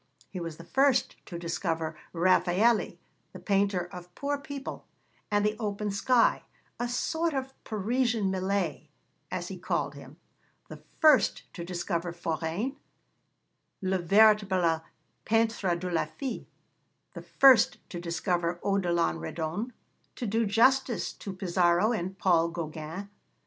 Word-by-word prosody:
He 185 - -5
was 165 -2 -6
the 170 - -10
first 265 +6 +2
to 170 - -6
discover 165 -2 -2 0.2
Raffaëlli, 185 +5 +2 0.4
'the - - -9
painter 195 -3 +1
of 180 0 -10
poor 285 +1 -2
people 280 -1 -7 0.4
and 205 0 +2
the 210 0 +1
open 210 -1 -2
sky 230 +4 +3 0.4
a 240 0 -1
sort 320 +6 -1
of 265 0 -3
Parisian 220 -1 0
Millet,' 190 +1 -1 0.4
as - - -4
he - - -7
called - - -1
him; - - -12 0.5
the - - -8 0.2
first 295 -10 +4
to 170 - -6
discover 175 -1 -3
Forain, 170 - -3 1.1
'le 190 0 +1
véritable 190 -3 +4 0.4
peintre 225 -5 +1
de 180 +1 -4
la 165 -2 +1
fille'; 260 - -6 0.7
the - - -7
first 260 -5 +5
to 175 - -5
discover 175 0 -1
Odilon 170 - +1
Redon, 165 - -4 0.4
to 245 - -4
do 225 +1 +1
justice 235 0 +2
to 200 - -7
Pissaro 180 +2 +2
and 190 -4 -3
Paul 170 -4 +3
Gauguin. 165 +2 -6
195 Hz, 130 wpm, -28 LUFS, 170-225 Hz, 1.1 s, first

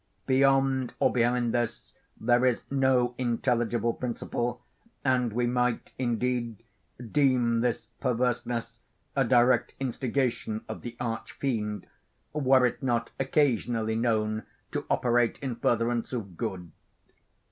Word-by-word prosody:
Beyond 135 -1 +3
or - - +3
behind 120 -1 +2
this 120 -2 -2 0.3
there 120 +2 +3
is 125 -2 +2
no 130 -3 +3
intelligible 120 -1 +1
principle; 120 0 -3 0.4
and 125 -3 +2
we 120 +3 0
might, 125 -1 0
indeed, 120 -2 -1 0.5
deem 125 -5 +3
this 120 -1 0
perverseness 120 -2 -1 0.4
a 135 - +3
direct 120 +1 +3
instigation 125 -4 -1
of - - -6
the 120 -1 -7
Arch 115 -2 -4
Fiend, 105 -6 -2 0.5
were 135 -3 +4
it 125 - -1
not 120 -3 0
occasionally 120 -5 +1
known 110 -2 +1 0.3
to - - -3
operate 120 -1 +2
in 130 -4 -4
furtherance 115 +1 0
of 100 -7 -4
good. 95 -5 -4
120 Hz, 115 wpm, -28 LUFS, 115-130 Hz, 0.5 s, were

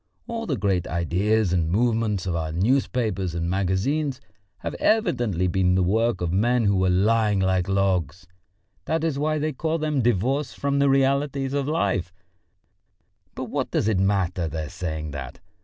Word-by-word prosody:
All 230 -1 -5
the 140 -6 -1
great 95 -3 0
ideas 90 +4 +1
and 85 -3 +1
movements 110 -1 +1
of 90 -2 -1
our 80 -1 -2
newspapers 105 -2 0
and 85 0 -2
magazines 100 - 0 0.4
have - - -4
evidently 120 - +1
been 90 0 +2
the 95 - +2
work 110 +2 +1
of 85 -2 -1
men 120 +5 +2
who 100 -1 +3
were 95 0 +2
lying 105 +2 +2
like 95 -1 +1
logs; 95 -3 0 0.6
that 160 0 -1
is 155 -4 -1
why 155 +1 0
they 155 0 -1
call 160 +4 -1
them 150 -3 0
divorced 120 +5 0
from 140 0 0
the 140 0 +4
realities 135 0 +1
of 140 -1 -1
life 100 - 0 1.2
but - - -4
what - - -3
does - - 0
it 105 -4 +2
matter, 95 -3 +1
their 80 -1 -4
saying 80 -5 -4
that! 70 -3 -7
100 Hz, 165 wpm, -24 LUFS, 90-135 Hz, 1.2 s, the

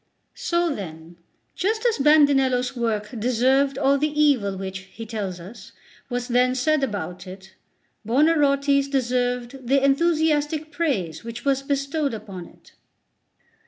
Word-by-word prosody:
So 345 -9 0
then, 165 - -9 0.4
just 440 +5 -1
as 465 -9 +2
Bandinello's 270 -4 +3
work 220 -3 -2
deserved 260 +4 +2
all 275 0 +2
the 300 +1 -1
evil 245 -11 +2
which, 190 0 -5 0.2
he 225 - -7
tells 205 -5 -5
us, 210 +5 -12 0.4
was 245 -1 -3
then 250 +1 +2
said 300 +3 +1
about 185 -6 -4
it, 190 +1 -11 0.5
Buonarroti's 280 +2 +2
deserved 250 -1 -2
the 275 +1 +3
enthusiastic 310 0 +1
praise 200 - -2
which 230 +2 -8
was 275 -1 +2
bestowed 280 0 -1
upon 190 -5 -9
it." - - -21
265 Hz, 125 wpm, -23 LUFS, 220-290 Hz, 0.5 s, Bandinello's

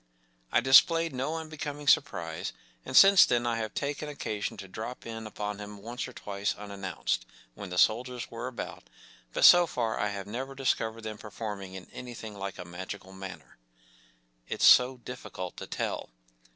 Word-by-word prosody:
” - - -39
I - - +4
displayed 165 +6 +6
no 135 +5 -2
unbecoming 150 -2 -6
surprise, - - +1 0.3
and - - 0
since 195 -1 +9
then 120 -1 +2
I 120 -1 0
have 110 -1 -4
taken 145 +1 -3
occasion 110 -6 -4
to 95 - -8
drop 110 +6 -7
in 115 -1 -6
upon 105 -1 -5
him 105 0 -8
once 120 +3 -4
or 130 - -11
twice, 100 -1 -3
unannounced, 95 -11 -3 0.3
when 100 +6 -8
the 90 - -5
soldiers 125 +5 +2
were 115 +2 -5
about, 130 - -7 0.5
but - - +3
so 175 -1 +9
far 115 -6 -2
I 105 - +1
have 100 -1 -5
never 130 +6 -5
discovered 115 -4 -1
them 110 -1 -6
performing 100 -3 -6
in 95 -1 -8
any¬ 125 -2 -9
thing 110 -1 -7
like 100 -1 -5
a 90 - -7
magical 95 +2 -8
manner.... 95 -7 -10 0.9
It’s - - +1
so 125 +1 +7
difficult 110 -7 -7
to - - -7
tell. - - -3
110 Hz, 175 wpm, -29 LUFS, 100-130 Hz, 0.9 s, since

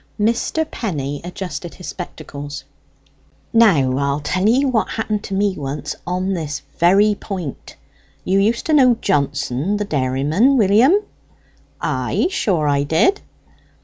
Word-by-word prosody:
Mr. 235 +9 +1
Penny 145 - -3
adjusted 180 -1 -6
his 180 - -8
spectacles. 145 -5 -7 0.9
"Now, 150 - +4
I'll 140 0 0
tell 185 +7 0
ye 260 +5 +3
what 245 -5 +1
happened 215 -2 -2
to 195 - -4
me 200 0 +1
once 145 0 -5
on 185 +2 -1
this 150 -5 -4 0.2
very 195 +5 +5
point. 185 -8 -7 0.5
You 190 +2 +2
used 220 +4 +1
to 315 - +1
know 255 -5 +5
Johnson 140 +5 0
the 210 - -2
dairyman, 150 - +2
William?" 225 - +5 0.8
"Ay, - - -1
sure; 175 - 0
I 140 -1 +2
did." 160 - +2
185 Hz, 130 wpm, -19 LUFS, 145-215 Hz, 0.9 s, very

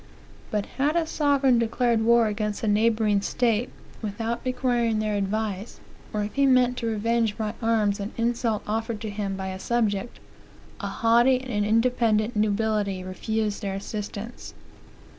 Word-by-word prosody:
But 210 -1 -1
had 290 +4 +2
a 335 -1 +2
sovereign 280 -5 +2
declared 230 0 +1
war 235 +1 +5
against 210 0 -2
a - - 0
neighboring 215 -1 +2
state, 235 +2 0 0.3
without 225 +2 -3
requiring 245 -3 0
their 215 0 -1
advice, 205 +1 -2 0.3
or 210 -1 -1
if 205 - -5
he 280 0 +3
meant 250 -1 +4
to 230 - -2
revenge 225 0 0
by 215 -2 -2
arms 215 -3 +1
an 200 +1 -4
insult 230 -2 0
offered 225 +1 -2
to 220 -2 -4
him 200 -1 -3
by 190 0 -4
a 190 0 -6
subject, 220 0 -1 0.6
a - - -3
haughty 240 +3 +3
and 245 -5 -2
independent 225 0 +2
nobility 210 -2 0
refused 210 +3 -2
their 195 -1 -3
assistance. 210 +3 -6
220 Hz, 150 wpm, -25 LUFS, 210-235 Hz, 0.6 s, war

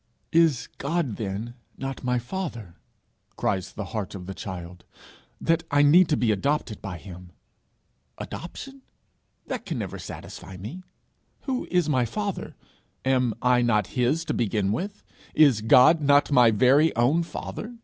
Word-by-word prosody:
'Is 160 -6 +3
God 145 -6 -1
then 110 +2 -4 0.2
not 135 -1 -5
my 125 0 +1
Father,' 120 - -5 0.6
cries 95 -2 -1
the 105 - -5
heart 105 -3 -4
of 90 -2 -8
the 95 - -6
child, 90 -2 -8 0.6
'that 165 0 +1
I 145 0 +4
need 165 +4 +6
to 150 - +2
be 115 -3 +2
adopted 115 +1 -1
by 95 -3 -6
him? 90 0 -11 0.9
Adoption! 270 +10 -8 0.6
that - - -4
can - - -4
never - - -5
satisfy 95 - -9
me. 110 - -8 0.6
Who 260 -2 -3
is 180 -3 +2
my 130 -5 +2
father? 200 - -4 0.5
Am 125 -3 +2
I 125 -1 +4
not 105 -5 +1
his 130 +7 +1
to - - -2
begin 105 -3 0
with? 195 - -4 0.3
Is 140 -8 +5
God 130 +8 +6
not 145 0 +4
my 125 -4 +6
very 130 +8 +4
own 125 +9 +3
Father? 220 +7 -6
125 Hz, 150 wpm, -25 LUFS, 105-160 Hz, 0.9 s, need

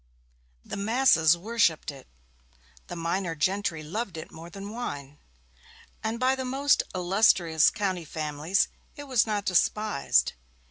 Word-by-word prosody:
The - - -6
masses 200 - +4
worshipped 175 -6 +1
it, 135 -2 -14 0.8
the 175 - -7
minor 170 +1 -2
gentry 185 -1 -1
loved 190 +3 -4
it 160 - -8
more 165 +1 -10
than 200 +3 -8
wine, 145 - -6 0.8
and 220 +1 -2
by 255 +1 +3
the 260 - -4
most 275 +3 +2
illustrious 175 -3 +3
county 190 -5 -3
families 155 +6 -1 0.3
it 290 - -8
was 255 -6 +2
not 205 -2 -2
despised. 205 -1 +2
190 Hz, 130 wpm, -27 LUFS, 160-220 Hz, 0.8 s, masses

